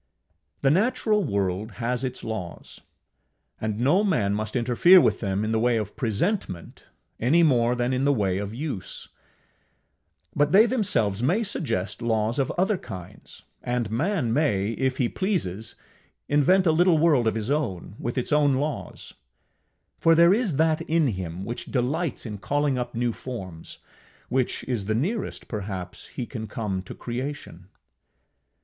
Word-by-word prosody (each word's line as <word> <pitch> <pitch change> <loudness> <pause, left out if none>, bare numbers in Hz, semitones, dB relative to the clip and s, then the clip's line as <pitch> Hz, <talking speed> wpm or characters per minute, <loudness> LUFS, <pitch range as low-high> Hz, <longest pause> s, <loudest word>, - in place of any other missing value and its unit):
The 135 - +4
natural 215 +2 +2
world 100 - -2
has 125 +2 -2
its 125 -1 -4
laws, 95 -6 -6 0.8
and 110 -1 -2
no 145 - +3
man 105 - +1
must 110 +2 -3
interfere 125 +10 +6
with - - +2
them 100 0 -1
in 110 - -1
the 110 - +1
way 120 0 +2
of 105 -2 -4
presentment 115 - -2 0.3
any 155 +9 +4
more 125 -5 +3
than 125 +1 0
in 130 +1 0
the 140 - +4
way 100 -7 0
of 100 0 -4
use; 125 -5 -6 1.3
but 145 0 +2
they 210 +4 +8
themselves 120 - +1
may 180 - +2
suggest 145 - -3
laws 115 +2 0
of 135 - +1
other 190 +1 +1
kinds, 90 -1 -10 0.2
and 120 -3 -2
man 140 - 0
may, 110 -9 +1
if 130 +2 -1
he 125 - +2
pleases, 115 - -3 0.5
invent 180 +7 +4
a 165 - +5
little 170 +1 +4
world 150 -7 +3
of 110 - +1
his 110 +3 -2
own, 105 - -2
with 120 +3 -4
its 130 +3 -1
own 145 -2 +4
laws; 145 +2 -4 0.9
for 165 0 +5
there 170 +2 +6
is 210 - 0
that 160 +1 +2
in 160 -3 +1
him 90 -2 -5
which 120 +1 -5
delights 140 +6 -2
in 105 -3 -6
calling 145 +5 0
up 125 -1 -4
new 120 0 0
forms 95 -12 -8 0.5
which 130 0 0
is 115 -6 -3
the 110 +1 0
nearest, 190 - -2
perhaps, 95 -4 -6
he 125 - -5
can 110 -2 -6
come 100 -3 -3
to 90 - -10
creation. 120 - -6
125 Hz, 155 wpm, -25 LUFS, 110-155 Hz, 1.3 s, they